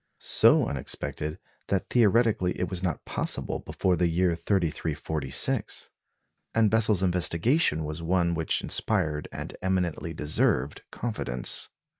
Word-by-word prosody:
So - - +4
unexpected 75 +3 -4 0.3
that 95 -2 -1
theoretically 110 -4 +3
it 90 0 -2
was 90 -2 -3
not 90 -3 -3
possible 65 -2 -2
before 90 -1 0
the 90 0 +2
year 85 +1 +1
3346; 80 -5 -1 0.6
and 110 -2 +3
Bessel's 110 -4 +2
investigation 90 - +2
was 75 +2 -5
one 85 0 +1
which 80 -1 0
inspired 75 -1 0
and - - -7
eminently 90 -3 -1
deserved 75 -2 0
confidence. 85 - -2
85 Hz, 115 wpm, -27 LUFS, 75-95 Hz, 0.6 s, So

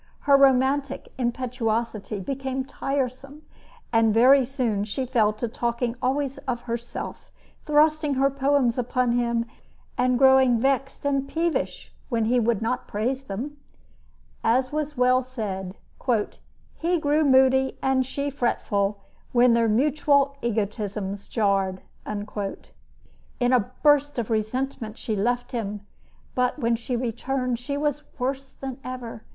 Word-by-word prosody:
Her 280 -1 +5
romantic 275 0 +2
impetuosity 235 -4 -2
became 265 +4 -3
tiresome, 275 +2 -3 0.5
and 225 -1 +4
very 260 +5 +6
soon 240 -6 -1
she 220 +5 -3
fell 230 -4 +2
to 215 +3 -3
talking 235 +1 -2
always 275 +1 -1
of 240 -1 -1
herself, 235 0 -6 0.4
thrusting 300 -1 +3
her 275 +1 +3
poems 270 -3 +2
upon 250 0 +1
him, 235 -1 +1 0.5
and 250 0 +3
growing 265 -2 +5
vexed 270 +2 0
and 275 -1 +1
peevish 335 +2 -2 0.2
when 230 -4 +1
he 245 +2 +3
would 225 -2 +1
not 250 +3 -2
praise 255 +6 -2
them. 260 +9 -5 0.9
As 255 +3 +2
was 300 -1 -3
well 250 +1 +4
said, 205 -7 -5 1.0
"he 345 +1 +1
grew 300 +1 +2
moody 265 -1 +4
and 265 -1 +3
she 280 +2 -3
fretful 205 -6 -1 0.3
when 245 -1 +5
their 230 -1 +3
mutual 280 +3 +2
egotisms 205 -3 -3
jarred." 195 -4 0 0.2
In 210 +4 -5
a 245 -1 +2
burst 290 -1 +4
of 235 -1 -2
resentment 225 +1 -2
she 220 -4 -3
left 245 +4 -1
him, 210 -4 -4 0.5
but 250 +2 +1
when 235 -4 +1
she 240 +2 -3
returned, 250 +1 -2
she 280 +3 -4
was 295 0 -1 0.2
worse 270 +1 -2
than 265 -2 -7
ever. 250 -3 -6
250 Hz, 130 wpm, -25 LUFS, 230-270 Hz, 1.0 s, very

